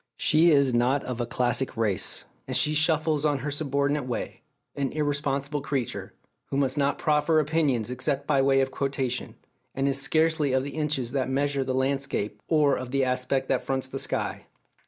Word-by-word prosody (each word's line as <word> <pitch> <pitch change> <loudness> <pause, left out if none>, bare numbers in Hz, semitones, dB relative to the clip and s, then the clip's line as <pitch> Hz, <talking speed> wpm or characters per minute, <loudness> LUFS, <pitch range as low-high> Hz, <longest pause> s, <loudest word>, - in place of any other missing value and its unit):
She 160 +3 +4
is 140 -4 +4
not 125 +4 +2
of 125 -1 -4
a 120 - -2
classic 125 +1 0
race, 105 -5 0 0.2
and - - 0
she 150 - +1
shuffles 155 -1 +2
on 145 -2 +2
her 150 - -2
subordinate 140 -1 -1
way, 120 - -4 0.3
an 140 -2 -1
irresponsible 145 -1 -1
creature, 135 -4 -3 0.3
who 135 - -3
must 135 -1 +1
not 140 -1 +1
proffer 155 +1 +2
opinions 145 -7 0
except 135 +2 -2
by 135 - +2
way 135 0 +4
of 135 0 -1
quotation, 135 -2 -2 0.4
and 135 +1 0
is 135 0 +1
scarcely 155 0 +2
of 130 0 +2
the 140 - -5
inches 150 -6 -2
that 130 -1 -1
measure 140 0 0
the 130 0 -2
landscape 130 -6 -1
or 150 -3 +3
of 130 -1 -6
the 135 +1 +1
aspect 130 +1 0
that 130 - +2
fronts 130 -1 -2
the 135 +1 -5
sky. - - -3
140 Hz, 180 wpm, -26 LUFS, 130-150 Hz, 0.4 s, She